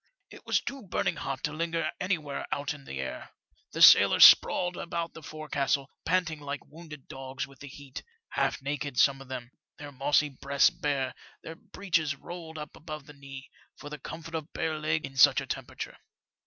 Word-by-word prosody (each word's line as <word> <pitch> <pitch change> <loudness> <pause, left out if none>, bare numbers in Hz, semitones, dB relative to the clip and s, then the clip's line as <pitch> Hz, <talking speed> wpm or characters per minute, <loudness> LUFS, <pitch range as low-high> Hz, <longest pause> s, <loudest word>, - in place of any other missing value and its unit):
It - - -14
was - - +3
too 275 -1 -6
burning 175 -4 -1
hot 135 -2 -4
to 150 - -2
linger 165 0 -1
anywhere 160 -7 -2
out 145 -1 -1
of 145 -2 -13
the 65 - -6
air. 65 -1 -5 0.4
The - - +2
sailors - - +9
sprawled 180 0 +6
about 170 -1 -4
the 160 - -10
forcastle, 145 -2 -2
panting 175 -4 +1
like 145 0 -6
wounded 155 -3 -12
dogs 135 +1 -6
with 140 -2 -18
the 145 - -9
heat 140 -1 -9 0.2
— 455 0 -55
half - - -1
naked 145 -2 -3
some 135 +1 +4
of 135 - -12
them, 125 -2 -7 0.3
their 145 0 -9
mossy 145 +2 +2
breasts 140 +2 +2
bare, 145 -7 -2 0.3
their 160 - -7
breeches 165 -4 -2
rolled 165 +2 -9
up 150 -1 -8
above 155 -2 -8
the 150 - -13
knees, 140 -1 -10 0.3
for 145 - -10
the 150 - -6
comfort 165 +4 -8
of 160 -1 -4
bare 155 -1 -2
legs 155 0 0
in 135 0 -14
such - - +7
a - - -5
temperature. - - -6
150 Hz, 190 wpm, -29 LUFS, 140-160 Hz, 0.4 s, sailors